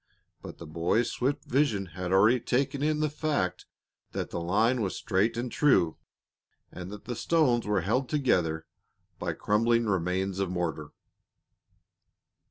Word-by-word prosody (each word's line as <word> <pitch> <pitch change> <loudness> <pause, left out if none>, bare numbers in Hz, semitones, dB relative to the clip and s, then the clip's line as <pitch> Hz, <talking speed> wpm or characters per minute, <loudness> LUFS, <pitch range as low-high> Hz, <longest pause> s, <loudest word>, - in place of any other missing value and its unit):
But - - -9
the 85 - -9
boy's 85 +9 0
swift 140 +3 -1
vision 120 -8 +1
had 90 0 -4
already 105 +6 +5
taken 135 +4 -1
in 155 +1 +1
the 155 - +1
fact 145 - -2 0.5
that - - -4
the - - -3
line 110 +8 +2
was 95 -3 -2
straight 105 +4 0
and 120 0 -3
true, 110 - +3 0.7
and 90 0 -8
that 105 +1 -10
the 120 - -4
stones 125 -10 +2
were 105 -3 +1
held 120 +8 0
together 85 - +1 0.5
by - - -2
crumbling 115 +3 +2
remains 95 0 -1
of 95 -2 0
mortar. 85 -4 -3
105 Hz, 145 wpm, -28 LUFS, 90-125 Hz, 0.7 s, already